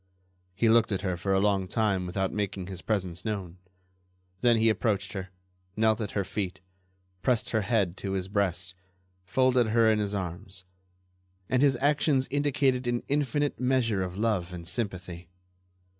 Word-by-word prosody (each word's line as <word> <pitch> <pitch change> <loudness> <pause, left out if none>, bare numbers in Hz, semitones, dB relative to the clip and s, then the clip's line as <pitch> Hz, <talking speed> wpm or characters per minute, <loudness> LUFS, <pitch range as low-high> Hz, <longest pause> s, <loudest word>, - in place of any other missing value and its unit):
He 115 +4 +2
looked 115 0 +4
at 100 0 -1
her 95 -2 0
for 90 +3 -2
a 95 - +4
long 100 -2 +1
time 100 -3 0
without 95 +2 -1
making 100 -3 -2
his 95 -1 -7
presence 95 -5 -2
known; 95 -5 -4 0.8
then 120 +2 +4
he 110 +1 +3
approached 110 -3 0
her, 95 -2 -5 0.5
knelt 110 0 +3
at 105 - -4
her 100 - +2
feet, 95 -1 -4 0.6
pressed 115 +4 +1
her 110 - +2
head 100 -4 +1
to 95 -1 -4
his 95 -1 -2
breast, 95 -3 -1 0.5
folded 125 +3 +3
her 110 0 +4
in 110 - +2
his 105 -1 -1
arms, 95 +1 -6 0.8
and 130 0 +2
his 140 -2 +4
actions 140 0 +2
indicated 140 -3 +1
an 120 0 0
infinite 145 0 0
measure 125 -6 +1
of 90 0 -4
love 105 -5 0
and 85 -2 -8
sympathy. 90 -4 -3
105 Hz, 160 wpm, -28 LUFS, 95-120 Hz, 0.8 s, looked